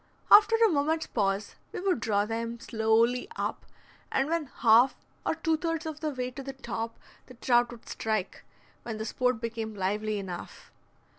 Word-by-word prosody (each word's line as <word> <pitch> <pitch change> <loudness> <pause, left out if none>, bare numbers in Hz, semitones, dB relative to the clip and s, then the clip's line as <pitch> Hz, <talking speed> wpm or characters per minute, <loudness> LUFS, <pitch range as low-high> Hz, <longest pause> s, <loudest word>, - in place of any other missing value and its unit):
After 425 +2 +8
a 455 0 +5
moment's 315 -2 +1
pause 200 -1 -1 0.2
we - - -5
would 370 -6 +1
draw 205 -2 +1
them 230 +1 -4
slowly 230 +5 +2
up, - - -3 0.4
and 270 +1 +1
when 330 -1 0
half 240 +1 +4 0.3
or - - +1
two 320 -1 +1
thirds 330 0 -2
of 315 -1 -5
the 310 - -1
way 255 -3 -3
to 265 - -7
the 270 0 -6
top 230 -3 -5 0.3
the 255 - -13
trout 240 0 +3
would 235 -2 -12
strike, 215 -4 -2 0.4
when 225 -2 -5
the 220 - -4
sport 250 +1 0
became 225 -1 -4
lively 210 +2 -1
enough. 185 -3 -7
240 Hz, 170 wpm, -29 LUFS, 220-295 Hz, 0.4 s, After